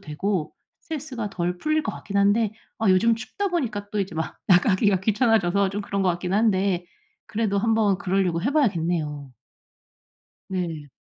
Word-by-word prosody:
되고 160 +2 -2 0.3
스트레스가 270 -9 -5
덜 180 -1 -2
풀릴 310 0 +1
것 215 - -3
같긴 200 0 -6
한데 205 +2 +3 0.3
아 220 -3 +1
요즘 225 +5 +4
춥다 390 - -3
보니까 225 - -2
또 210 - -1
이제 190 -4 -3
막 160 - -4
나가기가 190 +1 +4
귀찮아져서 200 -3 +2
좀 205 +1 -3
그런 200 0 -2
것 185 - +2
같긴 180 +2 -3
한데 195 -4 +2 0.4
그래도 210 -2 0
한번 220 -3 +2
그러려고 185 -3 0
해 265 +5 0
봐야겠네요. 165 - 0 1.2
네. 170 -6 -3
200 Hz, 325 characters per minute, -24 LUFS, 180-225 Hz, 1.2 s, 요즘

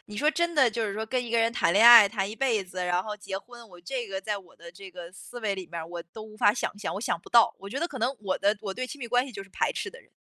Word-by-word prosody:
你 210 - -10
说 295 +7 +2
真 340 +1 -1
的 265 -6 +4
就 225 0 -2
是 200 - -4
说 220 +1 -3
跟 245 +2 -2
一 235 - -7
个 235 - +2
人 230 0 +2
谈 205 -7 +1
恋 215 +4 +6
爱 230 -4 +10
谈 195 -2 -2
一 215 - -7
辈 235 -7 +1
子， 185 0 -10
然 180 0 0
后 210 0 -6
结 195 -2 -6
婚， 235 +3 -14
我 180 -2 -15
这 240 +7 -4
个 195 -1 -5
在 210 +1 -3
我 190 - -18
的 170 0 -12
这 190 +2 -12
个 175 -1 -10
思 245 +5 -11
维 210 -3 -1
里 190 -2 -7
面 170 0 -6
儿 160 - -7
我 170 0 -7
都 220 - -9
无 215 0 -13
法 205 - +4
想 230 - -3
象， 205 - -4
我 200 - -4
想 210 - -1
不 - - -15
到。 235 -1 +5
我 195 - -9
觉 255 +7 -4
得 340 - 0
可 265 -6 -8
能 250 +4 0
我 195 -2 -2
的 205 +2 +2
我 195 -2 -4
对 255 +5 -4
亲 290 - -9
密 240 - -4
关 245 +2 +1
系 265 - -10
就 195 -3 -7
是 195 - -17
排 - - -1
斥 - - -4
的 485 - -14
人。 - - -25
215 Hz, 375 characters per minute, -27 LUFS, 195-240 Hz, -, 爱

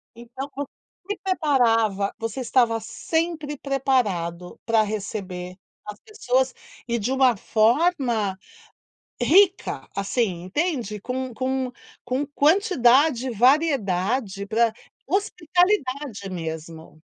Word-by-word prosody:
Então, 245 +4 -8
quando 280 0 -5 0.4
me 410 - -3
preparava 230 - +2
Você 225 +3 -4
estava 235 -2 +2
sempre 305 +6 -3
preparado 210 -12 -1
pra 225 -1 +3
receber 195 -4 -4 0.3
as 210 0 -8
pessoas, 260 - 0 0.3
e 235 -1 0
de 225 +5 -2
uma 260 -2 +4
forma 230 - +1 0.9
rica, 375 +8 +3
assim, 200 -3 -1
entende? 230 - -2
Com 255 +3 -4
com 260 +1 -2 0.3
com 265 +3 -1
quantidade, 285 - +3
variedade 225 - +1
pra 225 +2 +2 0.3
hospitalidade 330 - 0
mesmo. 160 -2 -7
245 Hz, 95 wpm, -24 LUFS, 210-285 Hz, 0.9 s, uma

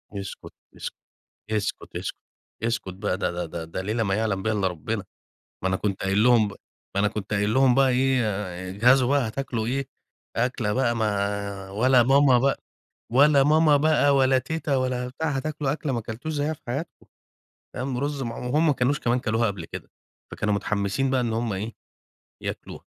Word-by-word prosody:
اسكت، 100 -1 -7 0.2
اسكت، - - -6 0.6
اسكت، 105 -2 -3
اسكت، - - -5 0.5
اسكت 115 -5 -1
بقى 95 -1 -2
ده 100 - -1
ده 90 0 -3
ده 85 0 -6
ده 80 +3 -5
ليلة 110 +4 -1
ما 95 -1 0
يعلم 105 -3 0
بيها 110 0 +1
إلّا 100 -2 +1
ربنا. 95 +5 -3 0.6
ما 95 - +2
أنا 95 - +1
كنت 100 -1 -2
قايل 95 +2 +2
لهم 120 -3 +5
ب - - -6 0.4
ما 100 - +2
أنا 105 - +3
كنت 105 -1 -4
قايل 105 +2 +1
لهم 130 -2 +5
بقى 135 -1 +5
إيه 130 0 +2
آآ، 95 -3 -4
اجهزوا 125 +7 +4
بقى 140 -4 +2
هتاكلوا 115 -1 -3
إيه، 135 +3 -1 0.5
أكلة 120 -3 0
بقى 125 -1 +1
ما 100 -2 -2
ولا 120 +5 +4
ماما 135 0 +5
بقى 140 +2 +2 0.6
ولا 140 +1 +6
ماما 155 0 +5
بقى 145 -1 +3
ولا 130 -1 +4
تيتا 145 +1 -2
ولا 125 -1 -1
بتاع، 160 +5 -3
هتاكلوا 145 0 -1
أكلة 150 -2 -3
ما 120 - 0
أكلتوش 115 +8 -5
زيّها 150 +1 0
في 155 - -10
حياتكم 140 +8 -5 0.7
تمام، 130 0 -3
رز 145 +1 -2
معم 115 +1 -5
وهمَّ 150 +6 +2
ما 150 - +4
كانوش 135 +3 +1
كمان 120 +1 +1
اكلوها 115 -1 +1
قبل 95 -5 -4
كده - - -9 0.4
فكانوا 105 0 -1
متحمسين 100 +5 0
بقى 130 -1 +2
إن 115 -2 -1
هُم 115 -1 -1
إيه 105 +4 -4 0.7
ياكلوها، - - -6
120 Hz, 185 wpm, -25 LUFS, 105-135 Hz, 0.7 s, ولا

